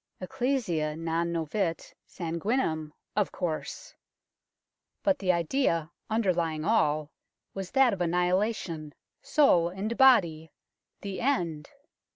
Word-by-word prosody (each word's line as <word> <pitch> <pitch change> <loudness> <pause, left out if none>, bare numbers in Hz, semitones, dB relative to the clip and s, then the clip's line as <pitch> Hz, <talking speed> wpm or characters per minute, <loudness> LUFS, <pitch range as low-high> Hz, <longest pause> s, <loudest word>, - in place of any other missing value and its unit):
Ecclesia 185 - -1
non 165 +1 -1
novit 165 +2 -2
sanguinem, 165 - -2 0.2
of 210 -1 +1
course. 180 - -4 1.1
But 290 -1 +2
the 185 -2 +2
idea 170 - 0 0.2
underlying 175 -8 0
all 155 -9 +1 0.4
was 195 -2 -5
that 265 -4 +4
of 185 - -4
annihilation, 175 -2 0 0.3
soul 175 - +4
and 200 +6 -4
body 180 - +4 0.5
the 195 -1 -5
end 170 - -1
175 Hz, 100 wpm, -28 LUFS, 160-220 Hz, 1.1 s, that